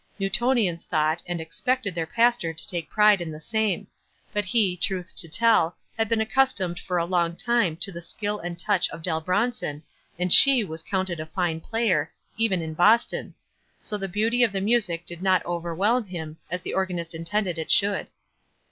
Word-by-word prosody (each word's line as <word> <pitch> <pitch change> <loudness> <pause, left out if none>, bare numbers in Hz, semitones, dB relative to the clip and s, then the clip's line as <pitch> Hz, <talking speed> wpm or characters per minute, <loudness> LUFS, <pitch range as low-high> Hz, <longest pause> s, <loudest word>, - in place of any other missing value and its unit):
Newtonians 195 -3 +1
thought, 155 0 0
and 175 -1 -3
expect 250 +10 -2
ed 200 - -2
their 165 -1 -3
pastor 230 -6 +1
to 160 - -2
take 170 -3 -4
pride 210 -3 +4
in 170 - -4
the 155 -1 -8
same; 215 0 -1 0.5
but 205 -1 -1
he, 195 -3 +1
truth 185 0 -3
to 170 - -2
tell, 200 -4 +3 0.2
had 225 -1 -1
been 230 - +1
accustomed 220 -7 +1
for 180 -2 -3
a 170 - +1
Ion. 170 -2 0
time 230 -7 +1
to 195 - -2
the 170 -1 -8
skill 210 +4 -3
and 175 0 -6
touch 195 0 +1
of 165 0 -10
Dell 160 -2 +1
Bron 205 +9 0
son, 150 -9 -6 0.3
and 180 0 +4
she 270 -4 +9
was 160 -4 -6
counted 185 -1 -2
a 155 - -6
fine 165 -1 -2
player, 180 -8 0 0.2
even 210 -6 0
in 160 0 -5
Boston; 210 +8 +2 0.4
so 210 - -3
the 195 -2 -3
beauty 225 +6 +1
of 230 - +2
the 195 - -1
music 195 -5 0
did 175 0 -4
not 185 -1 +2
overwhelm 175 +8 0
him, 160 -4 -7
as 180 +2 -4
the - - -5
organist 180 -3 -2
intended 170 +2 -1
it 160 - -5
should. 200 0 +2
185 Hz, 190 wpm, -25 LUFS, 170-215 Hz, 0.5 s, she